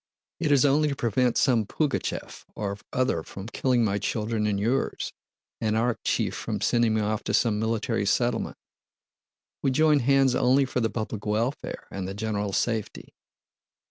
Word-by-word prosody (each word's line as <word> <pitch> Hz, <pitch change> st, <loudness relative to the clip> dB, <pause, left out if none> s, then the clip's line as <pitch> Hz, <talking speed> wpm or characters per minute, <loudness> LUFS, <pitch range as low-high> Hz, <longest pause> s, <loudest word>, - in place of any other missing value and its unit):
It 155 Hz, -4 st, +1 dB
is 145 Hz, 0 st, +5 dB
only 145 Hz, +2 st, +3 dB
to 140 Hz, -, -2 dB
prevent 120 Hz, -1 st, +1 dB
some 115 Hz, -6 st, +3 dB
Pugachëv 150 Hz, +1 st, -2 dB
or 100 Hz, -1 st, -3 dB
other 125 Hz, -10 st, +1 dB
from 95 Hz, +4 st, -9 dB
killing 120 Hz, +1 st, +1 dB
my 100 Hz, -1 st, 0 dB
children 110 Hz, 0 st, -1 dB
and 100 Hz, -1 st, 0 dB
yours, 120 Hz, +6 st, -1 dB, 0.5 s
and 110 Hz, -1 st, 0 dB
Arakchéev 120 Hz, +1 st, 0 dB
from -, -, -3 dB
sending 120 Hz, -2 st, +2 dB
me 110 Hz, -, +1 dB
off 105 Hz, 0 st, -1 dB
to -, -, +1 dB
some 110 Hz, -3 st, +2 dB
Military 110 Hz, -2 st, -1 dB
Settlement. 120 Hz, +2 st, 0 dB, 1.0 s
We -, -, +2 dB
join 150 Hz, +2 st, +4 dB
hands 135 Hz, 0 st, +3 dB
only 130 Hz, +2 st, +3 dB
for 125 Hz, -, -2 dB
the 115 Hz, -2 st, +1 dB
public 110 Hz, -2 st, -4 dB
welfare 115 Hz, +6 st, -2 dB
and 95 Hz, -1 st, -4 dB
the 95 Hz, -, -5 dB
general 105 Hz, -1 st, -2 dB
safety." 110 Hz, +1 st, -2 dB
115 Hz, 160 wpm, -26 LUFS, 105-130 Hz, 1.0 s, is